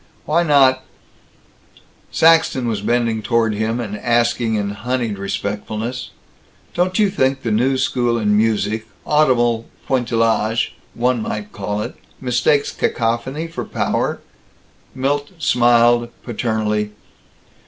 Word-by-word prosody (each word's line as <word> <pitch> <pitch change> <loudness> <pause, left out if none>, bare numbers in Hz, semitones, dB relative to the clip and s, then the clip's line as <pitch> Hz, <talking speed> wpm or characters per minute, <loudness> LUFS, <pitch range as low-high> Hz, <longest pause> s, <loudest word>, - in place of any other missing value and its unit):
Why 160 +4 +2
not 135 -5 +4 1.3
Saxton 160 -6 +4
was 110 -3 -1
bending 115 0 0
toward 115 0 +1
him, 110 +3 -1
asking 115 +1 0
in 100 -1 -1
honeyed 115 -1 -2
respectfulness: 105 +4 -4 0.6
"Don't 180 +1 0
you 210 -3 +3
think 135 -7 0
that 115 - -1
the - - +2
new 130 +4 +2
school 120 -2 +1
in 105 -2 +2
music 110 0 0 0.2
audible 120 -6 +2 0.2
pointillage, 115 -3 +1 0.2
one 120 0 +1
might 105 -1 -4
call 105 +1 -3
it - - -6 0.3
mistakes 130 +3 +1
cacophony 120 +7 -1
for 165 0 -5
power?" - - -1 0.8
Milt 145 +2 -1
smiled, 120 -4 +3
paternally. 105 -3 -1
120 Hz, 110 wpm, -19 LUFS, 110-130 Hz, 1.3 s, not